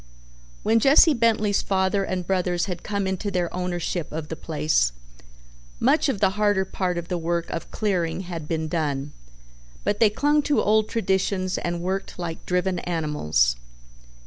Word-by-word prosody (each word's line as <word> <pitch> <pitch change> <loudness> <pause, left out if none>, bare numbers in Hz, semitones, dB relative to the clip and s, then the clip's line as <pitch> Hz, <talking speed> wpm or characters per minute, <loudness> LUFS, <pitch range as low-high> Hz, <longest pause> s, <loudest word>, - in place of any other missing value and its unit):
When 225 +1 +4
Jesse 285 +6 +6
Bentley's 220 -4 +2
father 190 0 +1
and 185 -2 -3
brothers 180 -1 0
had 180 -4 -5
come 200 -2 -2
into 190 +2 -2
their 180 -3 -1
ownership 175 -2 -3
of 155 0 -5
the 160 - -3
place, 150 - 0 0.9
much 305 - +3
of 220 - -1
the 195 -1 +3
harder 205 -1 +1
part 185 -2 -2
of 170 0 -4
the 180 -2 -2
work 170 0 -1
of - - -5
clearing 185 -5 -1
had 170 -4 -6
been 160 -1 -2
done, 145 -3 -2 0.7
but 205 - 0
they 225 - +6
clung 295 +7 +2
to 290 0 +1
old 215 +1 +2
traditions 190 -3 0
and 175 0 -3
worked 190 +2 -3
like 170 -2 -5
driven 180 0 0
animals. 150 - 0
180 Hz, 160 wpm, -24 LUFS, 165-205 Hz, 0.9 s, Jesse